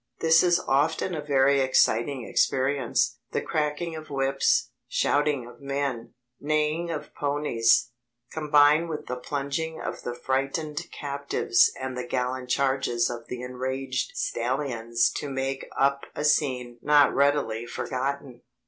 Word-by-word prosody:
This 165 0 +5
is 175 0 +3
often 150 +6 +1
a 155 - -3
very 140 -1 +3
exciting 130 -1 +2
experience: 130 -3 +1
the - - 0
cracking 155 +2 -2
of 155 0 -9
whips, 135 -1 +1 0.2
shouting 145 -3 +1
of 120 - -14
men, 140 -4 -3 0.2
neighing 155 +3 0
of 150 -2 -5
ponies, 120 -5 +1 0.4
combine 150 +1 +4
with 155 -2 -5
the 125 - -4
plunging 140 +5 -3
of - - -5
the 120 - -5
frightened 135 +4 -2
captives 140 -4 +1
and 130 -1 -4
the 125 -1 -5
gallant 125 0 -2
charges 130 -3 +1
of 120 -1 -8
the 125 0 -6
enraged 130 +1 -3
stallions 115 -2 0
to 145 - -4
make 135 0 -3
up 140 0 +1
a 150 - -2
scene 125 -5 +1
not 145 -1 +5
readily 135 -5 +1
forgotten. 130 0 -4
135 Hz, 130 wpm, -26 LUFS, 125-150 Hz, 0.4 s, This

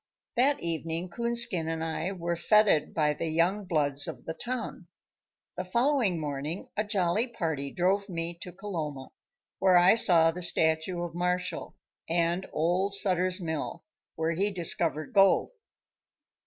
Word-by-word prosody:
That 275 +4 +2
evening 165 +1 -3
Coonskin 235 -7 +2
and 160 0 -3
I 165 +3 -3
were 170 -3 -3
fêted 200 -1 +3
by 150 -2 +1
the 165 +3 -4
young 175 +6 0
"bloods" 145 -5 0
of - - -8
the 160 - -4
town. 245 +7 -6 0.7
The 180 - -2
following 235 - +1
morning 150 +3 -5
a 210 - 0
jolly 205 +2 0
party 160 - -3
drove 195 +5 0
me 170 -1 -3
to 180 - -7
Coloma, 165 -8 -6 0.5
where 185 -2 +5
I 175 +3 +6
saw 170 -7 +4
the 180 +2 -8
statue 160 +1 +1
of 175 - -6
Marshall, 180 +1 -2 0.3
and 170 +2 0
old 180 +5 +1
Sutter's 185 -1 +2
Mill, 160 -4 -4 0.3
where 160 +1 -1
he 195 +5 0
discovered 170 - -1
gold. 195 - +4
175 Hz, 140 wpm, -28 LUFS, 160-195 Hz, 0.7 s, I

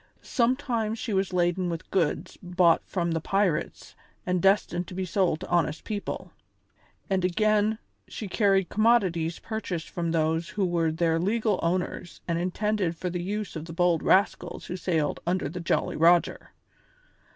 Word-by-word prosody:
Sometimes 235 -3 0
she 225 -1 -3
was 190 -1 0
laden 175 0 +1
with 170 +1 -6
goods 170 -1 0
bought 180 -2 +3
from 170 -3 -1
the 165 -1 -1
pirates 195 -3 -1 0.3
and 180 -1 0
destined 190 -2 +2
to 180 - -9
be 190 0 -2
sold 180 -3 +1
to - - -6
honest 165 -3 0
people; 205 -2 -5 0.8
and, 190 -3 0
again, 215 +3 +2 0.3
she 215 - -6
carried 195 -1 +2
commodities 190 -8 +2
purchased 200 -7 -5
from 170 -1 -2
those 160 +1 0
who 200 -2 -1
were 170 -2 +1
their 165 0 +1
legal 210 +2 +1
owners 175 0 -2
and 170 -1 0
intended 185 -1 -1
for 180 0 -3
the 175 0 -3
use 205 +2 -4
of 155 0 -5
the 165 - -8
bold 175 -1 +2
rascals 185 -2 +1
who 180 - -5
sailed 165 -5 -1
under 180 -3 0
the 165 +5 -6
Jolly 170 - 0
Roger. 170 +2 +3
180 Hz, 160 wpm, -27 LUFS, 170-200 Hz, 0.8 s, bought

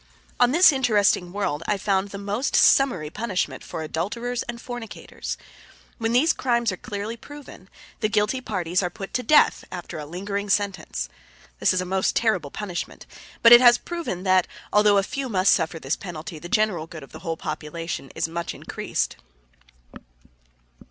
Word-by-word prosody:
On 245 -1 +5
this 340 +4 +7
interesting 210 -9 +2
world 180 -7 -2
I 210 - +1
found 195 0 0
the 200 - -7
most 205 +6 -2
summary 185 - +4
punishment 205 -3 -2
for 160 - -6
adulterers 235 +10 -3
and 235 0 -5
fornicators. 245 -3 -7 0.6
When 225 0 0
these 285 +8 +4
crimes 235 -3 +1
are - - -4
clearly 205 +4 -5
proven, 270 -8 -12 0.3
the 215 - +1
guilty 215 +4 +1
parties 185 -6 -1
are 180 - -1
put 195 +2 -8
to 250 - 0
death 305 +4 +4
after 175 -3 -6
a 150 - -7
lingering 200 +5 -4
sentence. 195 - -1 0.5
This - - +4
is 185 - +1
a - - -4
most 190 +1 0
terrible 190 -10 +1
punishment, 180 0 -6 0.4
but 230 - +8
it 240 0 +11
has 240 -1 +7
proven 335 - -5
that, 185 -1 +3 0.3
although 210 -1 +5
a 195 - +3
few 275 +3 -4
must 190 -2 +3
suffer 165 -1 +1
this 145 -1 -2
penalty, 165 -3 -8
the 175 - -9
general 210 -7 +1
good 160 -3 -9
of 135 - -14
the - - -10
whole 165 -1 -4
population 165 -2 -5
is - - 0
thereby 165 +1 -4
much 170 - -4
increased. - - -3
200 Hz, 170 wpm, -24 LUFS, 175-235 Hz, 0.6 s, it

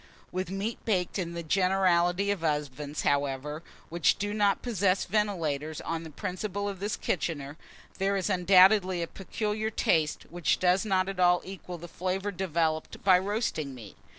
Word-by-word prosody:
With 185 0 -3
meat 195 +4 -4
baked 190 -3 0
in 170 -2 -3
the 170 - -4
generality 185 +1 +2
of 195 -5 -3
ovens, 150 -1 -2
however, 145 +2 0 0.3
which 170 0 +2
do 205 0 -2
not 205 -2 +2
possess 195 -5 +1
ventilators 165 -7 -1
on 165 0 -3
the 165 - -8
principle 200 +4 -4
of 195 -2 -5
this 205 +2 -2
kitchener, 145 -4 -3 0.4
there 195 +1 +1
is 190 - -1
undoubtedly 185 -1 +5
a - - -4
peculiar 210 +3 -3
taste, 160 -7 +1
which 175 -2 +1
does 185 +3 +2
not 190 -2 +1
at 195 -1 -5
all 180 0 +4
equal 185 -2 -7
the 170 +1 -9
flavour 190 +4 -2
developed 165 -4 -2
by 185 -2 +6
roasting 190 - -2
meat. 110 -5 -11
180 Hz, 160 wpm, -28 LUFS, 160-195 Hz, 0.4 s, by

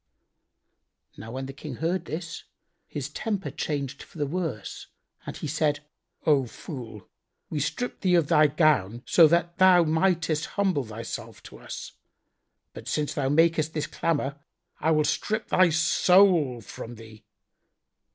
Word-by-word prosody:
Now 110 - -9
when 135 +1 -4
the 135 - -7
King 140 -1 -8
heard 170 +7 -1
this, 165 +2 -6 0.4
his 145 -3 -5
temper 200 +4 -3
changed 140 -2 -3
for - - -14
the 145 - 0
worse 145 - -4 0.4
and - - -5
he - - -6
said, 150 0 0 0.4
"O 140 -5 +3
fool,[FN#87] 115 - -9 0.5
we 150 - -1
stripped 245 - -3
thee 185 -2 +3
of 170 -3 +4
thy 155 -1 +5
gown, 140 - +2
so 165 -2 +6
thou 175 +2 +4
mightest 160 -1 +1
humble 185 -9 +1
thyself 110 +1 -7
to - - -12
us, - - -8 0.8
but - - -10
since 150 -1 -1
thou 135 -2 -1
makest 160 +1 +2
this 155 - -1
clamour 145 -3 -2 0.4
I 160 - +1
will 155 -1 +3
strip 215 +7 -1
thy 185 -1 +5
soul 165 -4 +4
from 115 +3 -9
thee." 110 -1 -14
155 Hz, 140 wpm, -26 LUFS, 135-170 Hz, 0.8 s, so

